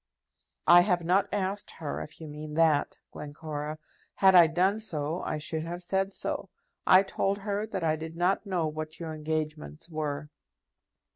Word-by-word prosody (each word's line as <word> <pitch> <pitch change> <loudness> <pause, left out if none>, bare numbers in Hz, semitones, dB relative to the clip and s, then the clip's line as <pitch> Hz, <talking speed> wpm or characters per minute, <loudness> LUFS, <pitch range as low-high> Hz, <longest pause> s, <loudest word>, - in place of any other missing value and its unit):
"I 175 0 +9
have 180 -2 +1
not 185 +4 +2
asked 200 0 -2
her, 155 -3 -5
if 155 - -9
you 160 - -8
mean 150 0 -7
that, 160 -3 +3
Glencora. 150 0 -6 0.4
Had 190 -1 +6
I 175 -2 +9
done 185 +6 +2
so, 160 -5 -2
I - - -2
should 155 +1 -3
have 175 +2 -5
said 190 +2 0
so. - - -3 0.4
I 185 +1 +8
told 195 0 -1
her 205 +1 -2
that 190 -5 -4
I 155 -1 +2
did 160 +1 -7
not 180 +3 +1
know 180 -4 0
what 155 0 -5
your 165 -2 -5
engagements 155 +1 -4
were." 150 -1 -3
165 Hz, 165 wpm, -29 LUFS, 155-185 Hz, 0.4 s, I